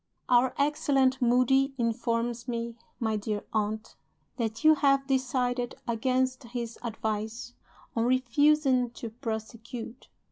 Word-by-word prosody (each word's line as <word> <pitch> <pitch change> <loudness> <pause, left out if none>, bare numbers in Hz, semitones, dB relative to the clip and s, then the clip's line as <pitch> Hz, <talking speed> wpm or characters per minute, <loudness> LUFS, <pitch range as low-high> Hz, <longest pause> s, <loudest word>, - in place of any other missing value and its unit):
Our 250 +1 +4
excellent 280 -3 +2
Moody 255 +3 +3
informs 235 0 -1
me, 235 -1 -3 0.2
my 220 -3 0
dear 210 0 -3
aunt, 215 0 -2 0.4
that 225 -2 -3
you 310 0 +8
have 275 -2 +3
decided 250 -2 0
(against 255 +3 0
his 235 -1 -5
advice) 225 +1 -4 0.4
on 230 0 +1
'refusing 260 0 +3
to 230 - -6
prosecute. 230 +1 -6
245 Hz, 110 wpm, -28 LUFS, 230-265 Hz, 0.4 s, you